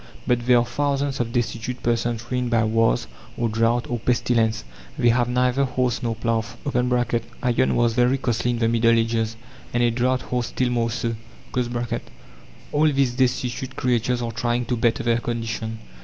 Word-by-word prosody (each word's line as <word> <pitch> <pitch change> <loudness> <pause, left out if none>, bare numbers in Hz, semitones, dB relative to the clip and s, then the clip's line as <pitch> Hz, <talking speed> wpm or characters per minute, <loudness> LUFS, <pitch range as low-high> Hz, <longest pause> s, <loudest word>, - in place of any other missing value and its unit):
But 120 0 0
there 125 -1 +6
are 120 - +3
thousands 140 0 -1
of 120 -1 -1
destitute 120 +1 -2
persons 120 0 0
ruined 125 -1 0
by 115 -2 +3
wars, 110 - +2 0.3
or 115 -1 0
drought, 115 +2 +1
or 120 -1 -2
pestilence. 115 - +1 0.3
They 120 - +4
have 120 +1 +2
neither 125 +2 +2
horse 125 -2 0
nor 115 -2 -1
plough. 115 0 0 0.2
(Iron 125 -1 0
was 120 -1 +2
very 125 +3 +3
costly 120 -2 -1
in 120 - 0
the 115 -1 +1
Middle 115 0 +3
Ages, 115 -1 0 0.4
and 120 - +3
a 120 - +3
draught 125 +2 0
horse 125 -1 -2
still 125 -1 -1
more 115 -1 +1
so.) 115 0 -2 1.6
All 150 +1 +3
these 135 -3 +1
destitute 125 +1 -1
creatures 125 -1 0
are 115 - -2
trying 120 +1 -1
to 125 - -1
better 120 +2 +1
their 115 0 +2
condition. 115 -1 -3
120 Hz, 170 wpm, -23 LUFS, 115-125 Hz, 1.6 s, there